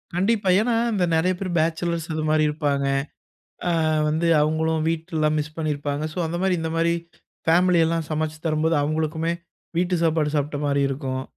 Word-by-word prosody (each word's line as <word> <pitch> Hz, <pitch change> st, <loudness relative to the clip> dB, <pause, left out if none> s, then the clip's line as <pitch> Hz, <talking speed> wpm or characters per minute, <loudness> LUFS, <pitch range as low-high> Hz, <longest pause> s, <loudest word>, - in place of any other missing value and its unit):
கண்டிப்பா, 200 Hz, +1 st, +1 dB
ஏன்னா 230 Hz, +1 st, +1 dB, 0.2 s
இந்த 185 Hz, -3 st, +2 dB
நெறைய 180 Hz, +3 st, +2 dB
பேர் 190 Hz, -2 st, -3 dB
பேச்சலர்ஸ் 165 Hz, +1 st, 0 dB
அது 155 Hz, -, -2 dB
மாரி 155 Hz, 0 st, +3 dB
இருப்பாங்க. 145 Hz, -2 st, -1 dB, 0.8 s
அ -, -, +2 dB, 0.4 s
வந்து 160 Hz, +3 st, 0 dB
அவங்களும் 160 Hz, +1 st, +1 dB
வீட்டலாம் 160 Hz, -2 st, 0 dB
மிஸ் 150 Hz, +1 st, -4 dB
பண்ணியிருப்பாங்க. 145 Hz, -1 st, -2 dB
ஸோ -, -, -6 dB
அந்த 165 Hz, -, -3 dB
மாரி, 190 Hz, -1 st, +2 dB
இந்த 160 Hz, 0 st, -2 dB
மாரி 170 Hz, 0 st, +2 dB, 0.6 s
ஃபேமிலி 175 Hz, +1 st, +4 dB
எல்லாம் 165 Hz, -1 st, -1 dB
சமைச்சு 155 Hz, 0 st, -2 dB
தரும்போது 160 Hz, +1 st, +1 dB
அவங்களுக்குமே 160 Hz, +2 st, -1 dB, 0.5 s
வீட்டு 180 Hz, +1 st, +1 dB
சாப்பாடு 155 Hz, -2 st, +1 dB
சாப்பிட்ட 145 Hz, 0 st, -1 dB
மாரி 140 Hz, 0 st, +2 dB
இருக்கும். 130 Hz, -1 st, -3 dB
160 Hz, 160 wpm, -23 LUFS, 150-170 Hz, 0.8 s, ஃபேமிலி